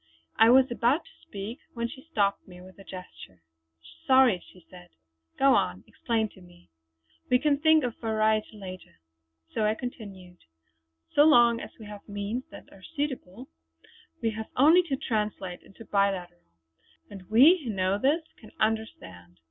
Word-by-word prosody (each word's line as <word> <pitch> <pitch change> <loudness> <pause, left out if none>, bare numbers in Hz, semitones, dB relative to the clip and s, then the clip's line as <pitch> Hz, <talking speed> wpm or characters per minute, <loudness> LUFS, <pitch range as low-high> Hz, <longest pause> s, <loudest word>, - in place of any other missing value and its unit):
I 225 - +6
was 260 +1 +5
about 245 +6 +1
to - - -22
speak 205 +5 -7 0.2
when 235 0 -2
she 260 +2 -11
stopped 200 -5 0
me 180 -1 -13
with 185 +2 -15
a - - -12
gesture. 180 - -12 0.6
"Sorry!" 260 -8 +5
she 180 -3 -20
said. 175 -1 -15 0.5
"Go 275 0 +5
on; 90 - 0
explain 225 -2 -2
to 190 - -19
me! 175 - -20 0.6
We 250 - +5
can 285 +1 +1
think 315 -1 +4
of 245 -2 -3
variety 220 -1 0
later!" 185 -2 -10 0.6
So 220 - -1
I 215 +1 +1
continued: 195 -8 -9 0.8
"So 290 - +6
long 240 -6 +5
as - - -11
we 220 - -10
have 205 0 -11
means 205 +5 -4
that - - -14
are 195 - -17
suitable, 260 - -6 0.7
we 225 - +1
have 220 0 -7
only 315 +7 +6
to 275 - -1
translate 210 -7 -3
into 210 +4 -15
the - - -25
biliteral, 190 -4 -1 0.7
and 190 -3 -11
we 290 +11 +6
who 245 - -5
know 190 -1 0
this 295 +7 +1 0.2
can 215 - -16
understand. 90 - -3
215 Hz, 165 wpm, -27 LUFS, 190-250 Hz, 0.8 s, I